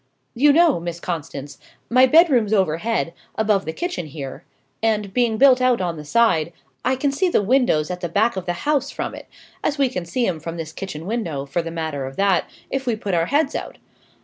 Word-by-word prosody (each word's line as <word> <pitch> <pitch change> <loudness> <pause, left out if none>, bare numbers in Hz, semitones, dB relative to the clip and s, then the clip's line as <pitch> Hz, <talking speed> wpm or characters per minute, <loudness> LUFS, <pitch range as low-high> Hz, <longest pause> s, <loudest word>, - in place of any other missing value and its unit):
"You 290 +5 +5
know, 325 - +4
Miss 170 0 -5
Constance, 145 -5 -6 0.3
my 255 +2 +5
bedroom's 260 - +4
overhead, 190 0 0 0.2
above 210 -3 +1
the 160 - -2
kitchen 345 - -4
here, 140 0 -7 0.4
and, 210 -3 0
being 240 -3 +1
built 260 0 +6
out 255 -2 +3
on 175 -3 -2
the 150 - -8
side, 170 -5 +2 0.3
I 260 - +2
can 275 +2 0
see 360 +7 +1
the 210 - +2
windows 205 - +2
at 180 0 -5
the 175 - -3
back 220 +7 +2
of 185 -1 -5
the 175 - 0
house 285 -2 +1
from - - -4
it - - -10 0.4
as 295 - 0
we 275 -2 +2
can 180 -8 -4
see 240 +8 -1
'em 170 -6 -1
from 165 +2 -6
this 160 -1 -6
kitchen 170 -5 -6
window, 175 -11 -3
for 140 +5 -1
the 165 - -6
matter 160 -5 -4
of 135 - -9
that, 195 -3 +2 0.2
if 270 -1 -3
we 235 - +2
put 205 -3 -4
our 165 -1 +2
heads 290 +3 +1
out. - - -5
200 Hz, 215 wpm, -22 LUFS, 165-255 Hz, 0.4 s, built